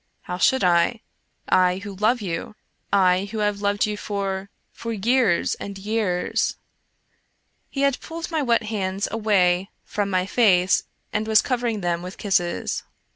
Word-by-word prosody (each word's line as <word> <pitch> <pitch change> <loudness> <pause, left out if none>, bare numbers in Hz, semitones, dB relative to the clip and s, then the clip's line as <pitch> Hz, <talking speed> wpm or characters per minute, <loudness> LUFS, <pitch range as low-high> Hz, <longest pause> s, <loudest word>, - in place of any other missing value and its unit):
How 180 0 -5
should 260 +3 +3
I? 180 +6 +3 0.2
— - - -45 0.2
I 180 0 -1
who 200 +1 -7
love 220 +5 +2
you 180 +2 -4 0.2
— - - -45
I 185 -1 +4
who 225 - -4
have 210 -1 0
loved 205 0 +1
you 210 0 -2
for 195 -1 -3
— - - -47
for 230 - -6
years 225 -3 +2
and 200 -1 -7
years! 200 -3 0 0.6
" - - -45
He 275 - -3
had 280 -1 +2
pulled 330 +1 -7
my 320 -2 0
wet 235 -4 +2
hands 200 -2 -2
away 195 -4 +2 0.2
from 205 -1 -2
my 185 -1 +1
face 190 -4 +3 0.3
and 215 +1 -1
was 220 -1 +5
covering 240 -4 -1
them 175 -1 -1
with 180 +1 -8
kisses. 180 -4 0
205 Hz, 170 wpm, -23 LUFS, 185-225 Hz, 0.6 s, was